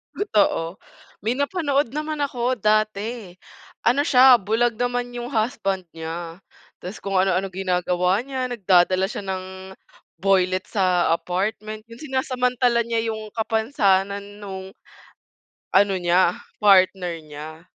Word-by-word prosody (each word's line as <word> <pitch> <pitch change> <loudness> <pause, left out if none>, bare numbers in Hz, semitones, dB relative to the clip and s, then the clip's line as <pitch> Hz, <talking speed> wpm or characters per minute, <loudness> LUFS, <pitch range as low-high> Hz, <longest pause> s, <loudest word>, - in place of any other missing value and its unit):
Totoo. 195 - +1 0.5
May 235 +4 0
napanood 285 -4 0
naman 305 0 -3
ako 255 -3 -1
dati, 215 0 0 0.5
ano 250 +5 +4
siya 260 -3 +7
bulag 225 +3 +1
naman 245 +1 -2
yung 240 +2 -5
husband 195 -5 -1
niya. 165 +2 -6 0.4
Tas 185 +4 -7
kung 195 -1 -4
ano-ano 185 0 +2
ginagawa 180 0 0
niya 260 -2 -3
nagdadala 185 -3 +3
siya 205 - -6
ng 190 -1 -4 0.8
boylet 185 -1 +2
sa 180 -4 +2
apartment, 215 +5 -3
yung 230 +3 -13
sinasamantala 250 -3 +1
niya 230 -1 -1
yung 215 -1 -8
kapansanan 205 -3 0
nung, 190 -1 -7 1.0
ano 200 -1 +4
niya, 175 0 +2 0.2
partner 190 -3 +4
nya, 155 +2 -10
205 Hz, 115 wpm, -23 LUFS, 185-240 Hz, 1.0 s, siya